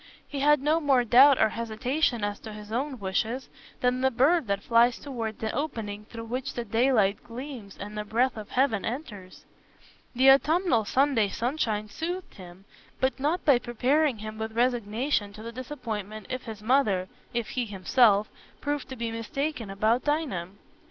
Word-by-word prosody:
He 285 - -5
had 295 0 +4
no 310 +3 +3
more 275 -5 +3
doubt 260 +4 +7
or 220 - +4
hesitation 235 +2 -1
as 205 0 -2
to 220 - -9
his 210 0 -10
own 265 +3 -2
wishes 220 +6 -2 0.3
than 250 0 +1
the 265 - +4
bird 270 +4 +3
that 200 0 -1
flies 235 +1 +4
towards 230 -6 -5
the 220 -1 -3
opening 215 -8 -4
through 230 +1 -8
which 255 +4 -4
the 240 - -3
daylight 225 -3 +2
gleams 245 -4 -8
and 210 +1 -7
the 210 - -3
breath 235 +5 +1
of 215 -2 -8
heaven 250 -6 +1
enters. 220 -7 -7 0.7
The 265 +2 +7
autumnal 295 - +3
Sunday 260 -2 +2
sunshine 225 -2 -1
soothed 345 - -5
him, 185 0 -13 0.3
but 260 +1 0
not 305 +6 0
by 280 -6 +5
preparing 260 +3 +1
him 215 +1 -7
with 220 0 -4
resignation 235 -2 0
to 215 +1 -10
the 230 - -6
disappointment 225 -6 -6
if 255 0 -4
his 220 -3 -8
mother—if 220 -2 0
he 250 -2 -2
himself—proved 215 +7 +1
to 260 - -6
be 230 -2 -3
mistaken 230 +1 -3
about 215 +5 +1
Dinah. 290 - -1
235 Hz, 165 wpm, -27 LUFS, 215-270 Hz, 0.7 s, doubt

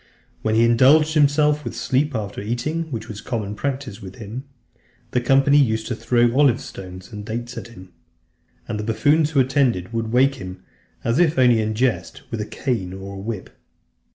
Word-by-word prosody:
When 110 0 0
he 115 - +5
indulged 140 +7 +5
himself 150 0 +3
with - - -5
sleep 140 +2 0
after 100 -3 -4
eating, 150 +10 -3
which 110 -3 -5
was 105 -2 -7
a - - -12
common 105 -5 -3
practice 130 -2 -4
with 95 -1 -9
him, 115 +5 -7 0.7
the 125 - +1
company 135 +3 +4
used 110 -5 +1
to 125 - -3
throw 120 +1 +2
olive 140 -4 +4
stones 95 -1 -10
and 105 -1 -7
dates 120 +3 -5
at - - -7
him. 95 -6 -13 0.8
And 105 - -3
the - - -3
buffoons 145 +8 +2
who 150 -3 +1
attended 125 -8 +1
would 115 -1 -2
wake 130 +3 +4
him, 90 0 -8 0.4
as 115 +6 +1
if 165 -3 +4
it - - -15
were 130 - +5
only 120 -3 +5
in 110 0 -2
jest, 100 -9 -1
with 115 -2 -2
a 105 - -4
cane 110 -9 -2
or 95 +1 -8
a 100 - -7
whip. 105 -1 -5
120 Hz, 200 wpm, -22 LUFS, 105-135 Hz, 0.8 s, he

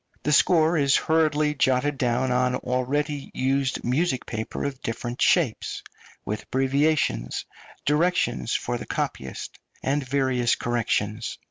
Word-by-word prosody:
The 150 - 0
score 160 +3 +4
is 140 -1 +4
hurriedly 155 -2 +2
jotted 135 0 +1
down 125 0 +1
on 125 0 +2
already 140 +4 -1
used 135 0 0
music 130 +2 0
paper 110 0 -4
of 140 -2 -4
different 120 +2 -4
shapes, 155 -11 +1 0.4
with 105 +1 -3
abbreviations, 135 - 0 0.4
directions 150 - +1
for - - -2
the - - -8
copyist, 65 0 -4 0.2
and 140 +2 0
various 130 -2 +1
corrections. 115 -2 -1
130 Hz, 120 wpm, -25 LUFS, 120-150 Hz, 0.4 s, score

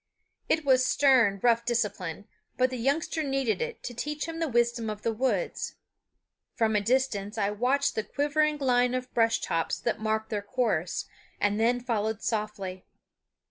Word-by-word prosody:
It 320 -2 +1
was 260 -2 +5
stern, 255 -8 +4
rough 235 -1 +4
discipline; 210 -6 -2 0.3
but 255 0 +2
the 255 - -3
youngster 290 +6 0
needed 270 - 0
it 475 0 -4
to 245 - -5
teach 295 +5 -3
him 330 0 -5
the 325 - 0
wisdom 240 -2 +1
of 210 -1 -6
the 230 - 0
woods. 260 - -1 0.8
From 220 -2 +1
a 210 - +3
distance 225 -3 0
I 205 -1 +1
watched 255 +7 +1
the 220 - -1
quivering 295 +4 +1
line 250 -2 +2
of 255 0 -4
brush 225 -1 +2
tops 165 -1 -1
that 235 -2 -1
marked 220 +1 -1
their 210 -2 -1
course, 205 -6 -1 0.3
and 205 +1 +1
then 240 +2 +3
followed 220 -3 -2
softly. 205 -4 -3
235 Hz, 165 wpm, -28 LUFS, 215-265 Hz, 0.8 s, was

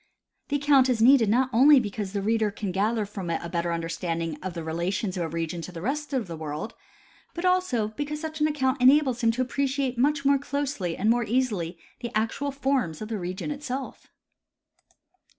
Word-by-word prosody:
The 290 - -1
account 280 -2 +4
is 245 -3 +1
needed 235 -2 +6
not 255 +4 +2
only 275 +4 +7
because 205 -3 -4
the 200 -1 -2
reader 220 0 +2
can 200 -1 -4
gather 210 +3 0
from 195 -3 -6
it 165 - 0
a 170 - -5
better 170 0 -1
understanding 165 -1 -2
of 185 -2 -5
the 165 - -4
relations 180 +5 -2
of 180 - -2
a 165 - -1
region 165 +1 -3
to 180 - -7
the 170 - -8
rest 290 - -3
of 260 -5 -1
the 170 -2 -7
world, 155 +5 -5 0.6
but 340 +2 -3
also 365 -13 +2
because 290 +6 -4
such 315 0 -6
an 305 - +5
account 265 -3 0
enables 260 -1 +5
him 230 - +3
to 255 +2 0
appreciate 270 -1 -1
much 280 +2 +2
more 280 0 +4
closely 280 -11 -3
and 215 +4 +3
more 240 0 +2
easily 210 -8 -1 0.2
the 240 -1 -4
actual 225 +6 -1
forms 265 - -1
of 215 - -6
the 220 -3 -3
region 185 +10 -4
itself. 275 -2 -5
230 Hz, 200 wpm, -26 LUFS, 180-275 Hz, 0.6 s, only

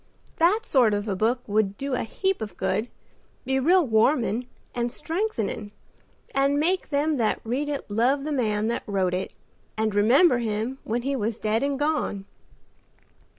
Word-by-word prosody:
That 365 +7 +3
sort 245 - +3
of 205 +1 -3
a 200 - -1
book 230 +6 +1
would 205 -1 0
do 275 0 -3
a 250 - 0
heap 380 - -1
of 205 -5 -6
good; 220 +4 -1 0.6
be 265 +1 +1
real 350 +5 +4
warmin' 235 0 +2 0.3
and 240 -1 -1
strengthening 300 - -3 0.6
and 275 +1 +2
make 365 +5 0
them 295 +1 +1
that 225 -3 +1
read 260 +6 -2
it 285 -1 -3
love 245 +7 +1
the 305 - -3
man 215 -6 0
that 235 - -1
wrote 190 -3 0
it, 185 +1 -2 0.5
and 215 -1 0
remember 245 - +5
him 225 +3 -2
when 235 +2 -2
he 275 +1 -1
was 225 -2 -2
dead 220 +1 0
and 280 0 0
gone." 290 -9 -1
245 Hz, 165 wpm, -25 LUFS, 215-285 Hz, 0.6 s, remember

